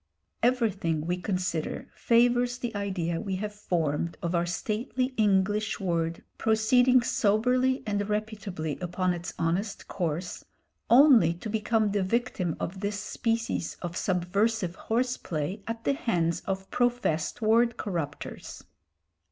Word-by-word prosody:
Everything, 205 Hz, -10 st, +1 dB
we 175 Hz, +1 st, 0 dB
consider, 180 Hz, -4 st, -2 dB
favours 245 Hz, +1 st, +3 dB
the 240 Hz, -3 st, -4 dB
idea 185 Hz, -5 st, -2 dB
we 195 Hz, -3 st, -2 dB
have 210 Hz, +2 st, -4 dB
formed 170 Hz, -5 st, -1 dB
of 170 Hz, +1 st, -1 dB
our 170 Hz, 0 st, +1 dB
stately 245 Hz, +8 st, -2 dB
English 205 Hz, 0 st, +2 dB
word 170 Hz, -3 st, -1 dB, 0.2 s
proceeding 245 Hz, +3 st, +4 dB
soberly 250 Hz, +6 st, +2 dB
and 205 Hz, -1 st, -1 dB
reputably 205 Hz, -8 st, -3 dB
upon 180 Hz, 0 st, 0 dB
its 175 Hz, 0 st, -6 dB
honest 180 Hz, +6 st, -1 dB
course 175 Hz, -1 st, -3 dB, 0.5 s
only 240 Hz, -, +7 dB
to 210 Hz, +5 st, -6 dB
become 220 Hz, -1 st, +1 dB
the 200 Hz, 0 st, +1 dB
victim 190 Hz, -4 st, -1 dB
of 190 Hz, +3 st, -4 dB
this 200 Hz, +1 st, -2 dB
species 225 Hz, -3 st, -2 dB
of 170 Hz, -1 st, -4 dB
subversive 185 Hz, +2 st, 0 dB
horse 245 Hz, +6 st, -1 dB
play 170 Hz, +6 st, -4 dB
at 230 Hz, 0 st, -4 dB
the 280 Hz, -, +2 dB
hands 175 Hz, -, 0 dB
of 190 Hz, 0 st, -2 dB
professed 240 Hz, -10 st, 0 dB
word 230 Hz, +2 st, +3 dB
corrupters. 165 Hz, -8 st, -5 dB
205 Hz, 125 wpm, -28 LUFS, 175-230 Hz, 0.5 s, only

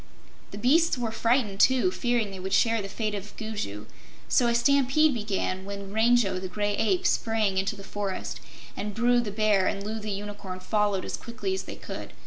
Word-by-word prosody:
The 200 Hz, -, -8 dB
beasts 300 Hz, +8 st, +3 dB
were 235 Hz, -2 st, -2 dB
frightened, 225 Hz, -3 st, +1 dB
too, 260 Hz, -, +4 dB
fearing 240 Hz, -, 0 dB
they 190 Hz, -, -7 dB
would 190 Hz, +1 st, -4 dB
share 230 Hz, -1 st, +3 dB
the 195 Hz, -, -6 dB
fate 215 Hz, +1 st, -2 dB
of 205 Hz, 0 st, -7 dB
Gugu, 205 Hz, -, -5 dB, 0.4 s
so 245 Hz, -, +3 dB
a 235 Hz, -, +2 dB
stampede 280 Hz, +4 st, +4 dB
began 200 Hz, -4 st, -2 dB
when 200 Hz, 0 st, -7 dB
Rango 220 Hz, -4 st, +3 dB
the 185 Hz, -, -5 dB
Gray 205 Hz, +2 st, -1 dB
Ape 200 Hz, -5 st, +1 dB
sprang 215 Hz, -4 st, +1 dB
into 195 Hz, +2 st, -1 dB
the 200 Hz, -, -10 dB
forest, 200 Hz, -1 st, -4 dB, 0.4 s
and 205 Hz, 0 st, -4 dB
Bru 240 Hz, +1 st, +3 dB
the 235 Hz, -3 st, -2 dB
Bear 205 Hz, -2 st, +2 dB
and 200 Hz, -, -2 dB
Loo 220 Hz, +1 st, -3 dB
the 215 Hz, 0 st, -6 dB
Unicorn 205 Hz, -2 st, -5 dB
followed 205 Hz, 0 st, 0 dB
as -, -, -4 dB
quickly 250 Hz, +11 st, -4 dB
as 380 Hz, -, -3 dB
they -, -, -7 dB
could. -, -, -8 dB
210 Hz, 195 wpm, -27 LUFS, 195-240 Hz, 0.4 s, too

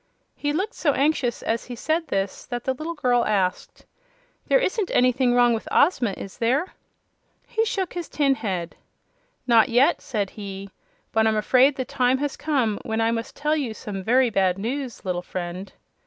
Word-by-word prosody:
He 290 Hz, -, -2 dB
looked 385 Hz, +10 st, -2 dB
so 290 Hz, -4 st, +1 dB
anxious, 275 Hz, -4 st, 0 dB
as 225 Hz, +1 st, -1 dB
he 245 Hz, -, -7 dB
said 320 Hz, +7 st, -1 dB
this, 195 Hz, 0 st, -3 dB
that 245 Hz, -1 st, -4 dB
the 265 Hz, -, 0 dB
little 315 Hz, +6 st, -5 dB
girl 245 Hz, -5 st, +2 dB
asked: 190 Hz, -5 st, -1 dB, 0.6 s
"There -, -, +5 dB
isn't 430 Hz, -5 st, 0 dB
anything 250 Hz, 0 st, +3 dB
wrong 245 Hz, -1 st, +5 dB
with 225 Hz, -, -4 dB
Ozma, 250 Hz, -, +3 dB
is 195 Hz, -, -9 dB
there?" 260 Hz, +10 st, +1 dB, 2.7 s
"Not 230 Hz, -3 st, +5 dB
yet," 245 Hz, +4 st, +3 dB
said 210 Hz, -6 st, -2 dB
he; 200 Hz, -1 st, -8 dB, 0.4 s
"but 220 Hz, 0 st, +3 dB
I'm 220 Hz, -1 st, +2 dB
afraid 260 Hz, +6 st, +4 dB
the 260 Hz, -, -3 dB
time 250 Hz, +1 st, +1 dB
has 285 Hz, +1 st, -2 dB
come 255 Hz, -9 st, 0 dB
when 220 Hz, 0 st, -2 dB
I 225 Hz, 0 st, +2 dB
must 230 Hz, 0 st, -4 dB
tell 300 Hz, +1 st, 0 dB
you 260 Hz, -8 st, -2 dB
some 200 Hz, -3 st, -6 dB
very 245 Hz, +4 st, +3 dB
bad 190 Hz, -3 st, +2 dB
news, 245 Hz, +2 st, -4 dB
little 180 Hz, -1 st, -1 dB
friend." 180 Hz, +1 st, -6 dB
245 Hz, 160 wpm, -24 LUFS, 210-280 Hz, 2.7 s, There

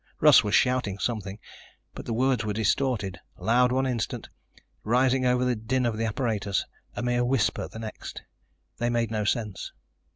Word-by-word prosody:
Russ -, -, +7 dB
was 105 Hz, -1 st, +1 dB
shouting 125 Hz, -6 st, +2 dB
something, 100 Hz, -2 st, -3 dB, 0.6 s
but -, -, -9 dB
the 115 Hz, -, -1 dB
words 125 Hz, -1 st, +2 dB
were 105 Hz, -1 st, -2 dB
distorted, 110 Hz, -3 st, 0 dB, 0.2 s
loud 125 Hz, +2 st, +3 dB
one 130 Hz, +1 st, +1 dB
instant, 120 Hz, -3 st, -3 dB, 0.5 s
rising 130 Hz, +3 st, +2 dB
over 125 Hz, 0 st, +2 dB
the 125 Hz, -1 st, +1 dB
din 120 Hz, +4 st, -1 dB
of 115 Hz, -2 st, 0 dB
the 115 Hz, +1 st, -1 dB
apparatus, 110 Hz, -4 st, -1 dB, 0.3 s
a -, -, -3 dB
mere 120 Hz, 0 st, +1 dB
whisper 125 Hz, -2 st, +1 dB
the -, -, -11 dB
next. 110 Hz, -1 st, -7 dB, 0.6 s
They 120 Hz, 0 st, +1 dB
made 115 Hz, -2 st, 0 dB
no 105 Hz, -2 st, -1 dB
sense. 105 Hz, -3 st, -2 dB
115 Hz, 165 wpm, -27 LUFS, 105-125 Hz, 0.6 s, Russ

